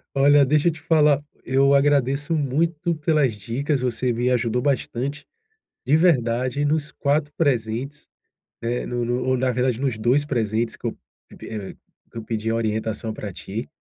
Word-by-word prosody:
Olha, 140 +1 +5
deixa 150 +4 +2
eu - - +4
te 160 - -11
falar, 150 -3 +3 0.2
eu 135 +1 +3
agradeço 140 +2 +2
muito 160 +4 0
pelas 150 -6 +1
dicas. 130 +7 -2
Você 125 0 0
me 120 +2 0
ajudou 125 -1 +1
bastante 140 +1 -2 0.6
de 145 +4 +4
verdade 130 -5 +2
nos 150 0 0
4 145 +1 0
presentes, 135 0 -1 0.5
né. 120 +1 -2
No 120 -1 -2
no 120 +1 -1
ou, 130 0 +1
na 130 0 +1
verdade, 125 0 0
nos 130 -6 -1
2 125 +6 +2
presentes 115 -4 -1
que - - -13
eu - - -2 0.5
eh, 105 -3 -6 0.4
que - - -10
eu - - -8
pedi 110 0 -3
uma 115 - 0
orientação 110 0 -2
para 105 -3 -7
ti. 110 +8 -6
130 Hz, 165 wpm, -23 LUFS, 115-145 Hz, 0.6 s, Olha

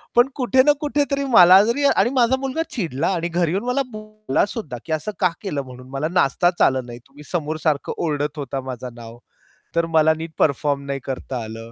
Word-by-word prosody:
पण 240 +2 +6
कुठे 260 0 +3
ना 295 - +5
कुठेतरी 285 -1 0
मला 185 -1 +9
जरी 235 +6 0
आणि 240 - +3
माझा 250 0 +4
मुलगा 270 +4 -2
चिडला 165 - -2
आणि 170 -1 -1
घरी 170 -1 0
येऊन 195 +4 -1
मला 250 +3 +1
बोललासुद्धा, 215 - -3
की - - -8
"असं 155 +7 -2
का 180 - +3
केलं?" 165 -9 -3
म्हणून 125 -1 -12
"मला 135 +3 -2
नाचताच 175 +2 +1
आलं 130 -2 +3
नाही. 120 0 -9
तुम्ही 140 +2 -15
समोर 155 -3 -2
सारखं 150 -3 0
ओरडत 150 -2 -2
होता 135 -1 -4
माझं 125 -1 -7
नाव, 115 0 -11 0.6
तर 170 0 +2
मला 160 0 +5
नीट 165 0 -6
परफॉर्म 140 -1 +1
नाही 140 0 -3
करता 130 -2 -5
आलं." 115 +1 -9
160 Hz, 195 wpm, -21 LUFS, 135-215 Hz, 0.6 s, मला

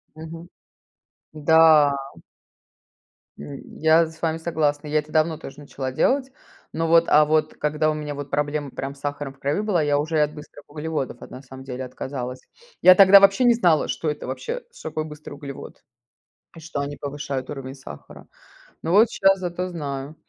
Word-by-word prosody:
Мгм. 165 +2 -9 0.8
Да. 155 -1 +5 1.5
М, 140 - -8 0.2
я 160 +1 +5
с 160 0 -14
вами 160 -1 0
согласна. 150 -3 -1
Я 155 +1 +1
это 150 0 -6
давно 160 0 +2
тоже 135 - -10
начала 135 -2 -6
делать. 265 - +1 0.4
Но 165 0 -1
вот, 165 0 +5
а 150 0 +6
вот 155 0 +1
когда 150 +1 0
у - - -2
меня 150 -1 -5
вот 145 0 -7
проблема 145 -1 -2
прям 135 +2 -6
с 140 - -19
сахаром 145 -1 -4
в 135 - -26
крови 140 +7 -1
была, 205 -5 +1
я 145 -1 +1
уже 160 +2 -2
и - - +3
от 150 0 +1
быстрых 150 -1 -13
углеводов, 150 -4 -4
вот, - - -11
на 125 - -9
самом 130 0 -12
деле, 130 0 -6
отказалась. 130 0 -6 0.4
Я 185 - +9
тогда 195 +1 +8
вообще 195 +5 +4
не 240 -1 +6
знала, 175 -9 +2
что 155 - -2
это 150 - -6
вообще, - - -5
что - - -8
такое 155 - -3
быстрый 150 -1 -10
углевод 140 -2 -10 0.7
и - - -10
что 160 -3 -5
они 145 +1 -4
повышают 140 -2 -5
уровень 135 -2 -7
сахара. 105 - -12 0.6
Но 165 - -2
вот 215 +4 +5
щас 195 0 +3
зато 180 0 -3
знаю. 145 -4 -6
150 Hz, 185 wpm, -23 LUFS, 140-165 Hz, 1.5 s, Я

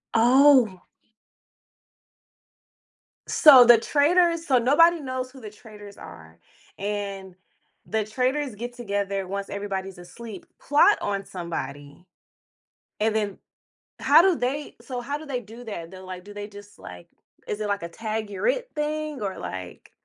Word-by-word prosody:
Oh. 245 -4 +5 2.4
So 275 -6 +8
the 240 -1 +8
traitors 330 +7 +2
so 265 -5 +3
nobody 320 +8 +4
knows 255 -2 -5
who 265 - -14
the 215 -3 -9
traitors 210 -2 -14
are, 80 -1 -13 0.4
and 200 -2 -5 0.5
the 220 0 -1
traitors 255 +3 -2
get 240 +3 -6
together 200 -4 -3
once 200 +1 -5
everybody's 195 -2 -5
asleep, 190 +3 -10
plot 295 +8 +4
on 200 -1 -3
somebody, 145 -3 -7 1.0
and 215 0 +1
then, 210 -3 -2 0.6
how - - +6
do 370 -1 +3
they 280 +4 -3
so 250 -2 -6
how 280 +4 -4
do 315 - -11
they 270 -4 -3
do 230 +2 -12
that? 170 -7 -7
They're, 185 +1 -12
like 185 -1 -9
do 205 - -11
they 205 0 -7
just, 205 0 -14
like 90 -1 -12 0.4
is 210 - -4
it 210 - -2
like 200 -2 -2
a 170 - -5
"tag, 215 +3 -4
you're 195 -2 -3
it," - - 0
thing 300 -2 -3
or 195 -2 -4
like 90 -1 -8
215 Hz, 145 wpm, -24 LUFS, 195-265 Hz, 2.4 s, So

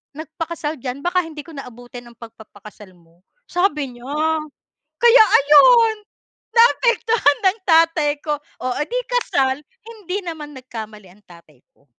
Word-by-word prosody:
nagpakasal 315 -1 -6
diyan, 255 +2 -6
baka 355 +1 0
hindi 310 -2 -9
ko 325 -3 -13
na 275 - -7
abutin 245 0 -12
ang 235 -1 -17
pagpapakasal 215 -3 -14
mo," 170 0 -27 0.3
sabi 300 -9 -1
niya. 240 - -14 0.9
Kaya 475 0 +6 0.2
ayun, 440 - +5 0.6
naapektuhan 460 -8 +3
ng 390 +4 +1
tatay 325 -2 +3
ko. 300 - -1 0.3
Oh 255 -1 -1
eh 295 - -1
di - - -2
kasal. 275 - 0 0.2
Hindi 410 -5 -6
naman 300 -4 -8
nagkamali 220 -5 -10
ang 205 +3 -23
tatay 170 -7 -19
ko. 140 - -32
295 Hz, 140 wpm, -19 LUFS, 240-355 Hz, 0.9 s, Kaya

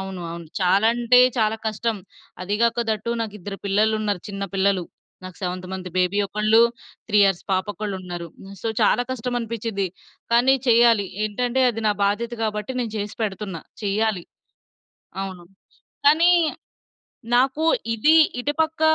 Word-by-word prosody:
అవును, 190 -1 -6
అవును. 170 -1 -8
చాలా 195 +4 +3
అంటే 240 +1 +4 0.2
చాలా 220 0 +2
కష్టం. 220 +1 -1 0.5
అది 200 +3 -2
గాకా 235 0 +2
దట్ 215 -2 -1
టూ 235 - +1
నాకిద్దరు 205 -3 -5
పిల్లలున్నారు 210 -1 +1
చిన్న 195 0 -4
పిల్లలు. 195 -2 +1 0.4
నాకు 185 -2 -9
7 180 -1 -4
మంత్ 185 -1 -5
బేబీ 185 +2 +1
ఒకళ్ళు, 215 +3 +3 0.5
3 210 -1 +3
ఇయర్స్ 195 -3 +1
పాప 185 0 +1
ఒకళ్ళున్నారు. 185 -4 -5
హ్మ్ 195 +1 -12
సో, 230 - -1
చాలా 245 - +3
కష్టమనిపించింది. 230 -4 -3 0.5
కానీ 245 +3 +5
చెయ్యాలి. 230 -3 +5 0.2
ఏంటంటే 245 +5 -1
అది 225 0 -6
నా 210 - +4
బాధ్యత 230 +4 -1
గాబట్టి, 210 +2 -2
నేను 230 -3 -3
చేసి 205 0 -4
పెడుతున్నా. 195 -5 -4 0.2
చెయ్యాలి. 205 -1 0 1.0
అవును. 185 -2 -7 0.6
కానీ, 330 +4 +6 1.0
నాకు 265 +5 +2 0.3
ఇది 300 +9 +4 0.2
ఇటు 290 +4 -1
పక్క 320 0 -2
210 Hz, 140 wpm, -23 LUFS, 195-235 Hz, 1.0 s, కానీ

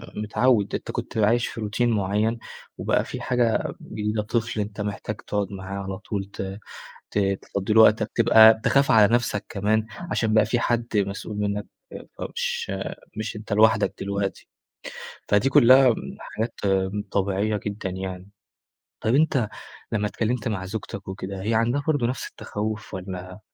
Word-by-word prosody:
متعود، 110 +1 +1
أنت - - -4
كنت - - -5
عايش 115 +3 +3
في 115 - -7
روتين 110 +3 0
معين 105 +2 0 0.4
وبقى - - +1
في - - -6
حاجة 120 -2 +1
جديدة 105 0 -2
طفل 115 +1 -2
أنت 105 0 -3
محتاج 105 +1 -4
تقعد 100 -1 -3
معاه 95 0 -5
على 95 0 -5
طول 100 -1 -4
ت 95 +2 -5 0.5
ت - - -1 0.2
تفضي 100 +2 -2
له 110 - +7
وقتك، 110 0 +5
تبقى 110 -1 +7
تخاف 140 0 +3
على 110 0 +6
نفسك 115 -4 0
كمان 110 +2 0 0.2
عشان 110 +1 +1
بقى 110 -1 +5
في 120 +2 +1
حد 120 -1 0
مسؤول 100 +1 -2
منك 105 0 -1 0.5
فمش 480 -1 -3 0.4
مش 110 +1 -4
أنت 105 -1 -8
لوحدك 110 0 +4
دلوقتي، 100 0 -3 0.8
فدي 105 +6 +3
كلها 130 -1 +7 0.2
حاجات 110 +2 -4 0.6
طبيعية 100 +2 0
جدًا 100 -1 -3
يعني، 95 0 -6 0.7
طيب 110 - +1
أنت 135 -6 +3 0.4
لما 105 -2 +1
اتكلمت 115 +1 -1
مع 100 -4 -3
زوجتك 100 0 -6
وكده 95 0 -5
هي 110 +3 0
عندها 120 +5 +1
برضه 145 -7 +2
نفس 125 +1 -3
التخوف 105 -1 -5
والّا 90 0 -7
105 Hz, 150 wpm, -24 LUFS, 100-115 Hz, 0.8 s, له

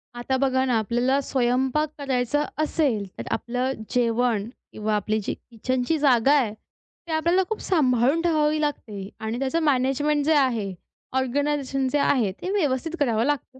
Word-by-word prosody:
आता 250 +2 -1
बघा 260 -1 +2
ना, 245 -3 +2
आपल्याला 245 +5 +1
स्वयंपाक 265 +3 +1
करायचं 275 +1 0 0.2
असेल, 280 -9 0
तर - - -5
आपलं 250 +2 -1 0.2
जेवण 235 -3 +1 0.2
किंवा 215 0 -1
आपली 215 +1 0
जी - - -2
किचनची 255 +6 -2
जागा 270 -2 +4
आहे, 235 -7 0
ती 325 +8 -17
आपल्याला 340 +4 +2
खूप 440 - -3
सांभाळून 275 -3 +2
ठेवावी 310 -2 +2
लागते 210 -9 -4
आणि 220 +2 -3
त्याचं 275 +5 0
मॅनेजमेंट 290 +1 +1
जे 320 - +4
आहे, 230 -8 +1 0.4
ऑर्गनायझेशन 275 0 0
जे 290 - +2
आहे 250 -8 +2
ते 365 - -3
व्यवस्थित 320 -4 0
करावं 235 -5 +2
लागतं. 275 -2 -2
260 Hz, 150 wpm, -24 LUFS, 240-295 Hz, 0.4 s, जागा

